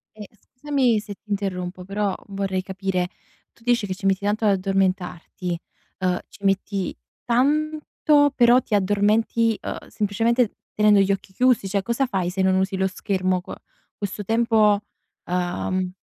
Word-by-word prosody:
Eh, 210 -2 -9 0.3
scusami 260 -5 +2
se 210 0 -7
ti 210 - -24
interrompo, 185 -3 -3
però 195 0 -1
vorrei 195 -2 -2
capire. 190 -1 -2 0.4
Tu 230 - -24
dici 240 -3 +2
che 185 - -2
ci 195 +1 -8
metti 195 0 +2
tanto 210 +2 0
ad 205 - +5
addormentarti, 185 -2 -1 0.4
uhm, 185 -1 +1
ci 200 - -17
metti 195 -1 0 0.3
tanto, 295 +2 +2
però 240 +1 +6
ti 215 - -1
addormenti, 210 +3 +2
uhm, - - -6
semplicemente 225 +3 +1 0.2
tenendo 210 -1 +5
gli 195 0 +3
occhi 195 0 -3
chiusi? 250 -2 +3
Cioè, 195 0 0
cosa 235 +6 0
fai 190 -6 -1
se 190 +1 -2
non 190 0 +3
usi 190 0 0
lo 190 0 +2
schermo 185 -1 -1
qu 190 - -9 0.4
questo 205 0 -4
tempo, 220 -1 +3 0.5
uhm 180 +1 -1
200 Hz, 155 wpm, -23 LUFS, 190-225 Hz, 0.5 s, però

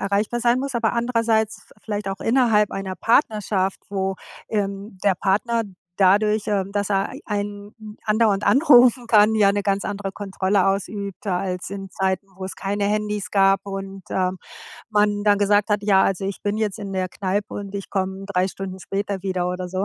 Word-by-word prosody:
erreichbar 205 +4 0
sein 240 +1 +3
muss, 270 0 -3
aber 225 -2 +1
andererseits 230 -2 0
vi - - -19
vielleicht 205 -2 -3
auch 195 - -5
innerhalb 225 -4 +3
einer 190 -1 -4
Partnerschaft, 210 -6 +1
wo, 195 -1 -2 0.3
ähm, 200 -1 -3
der 200 -2 +4
Partner 210 +6 +1 0.3
dadurch, 210 +2 +3
ähm, 200 -2 -1
dass 205 0 -1
er 195 -1 0
e - - -9
einen 205 +1 -5
a - - -1
andauernd 210 -2 +2
anrufen 250 -4 +5
kann, 215 -1 +5
ja 200 -2 +5
'ne 205 0 -1
ganz 200 0 0
andere 200 -1 -3
Kontrolle 195 -1 0
ausübt 200 0 -3
als 180 -1 -2
in 195 -1 -6
Zeiten, 190 +1 -1
wo 190 - -6
es 190 - -6
keine 200 +1 -2
Handys 210 -1 -1
gab 195 -1 +4
und, 195 -1 -6
ähm, 185 0 0 0.5
man 210 -1 +2
dann 205 -1 +4
gesagt 205 +1 +3
hat: 210 0 +1
„Ja, 195 -2 +5
also 195 0 0
ich 195 0 -4
bin 205 0 -1
jetzt 215 -1 -1
in 200 -1 -6
der 185 -1 -1
Kneipe 200 +2 -3
und 200 -1 -6
ich 200 -1 -6
komme 190 0 -2
3 190 -2 0
Stunden 190 0 -7
später 195 0 -3
wieder“ 185 -2 -1
oder 180 0 -4
so. 185 +2 -2
200 Hz, 190 wpm, -22 LUFS, 195-210 Hz, 0.5 s, anrufen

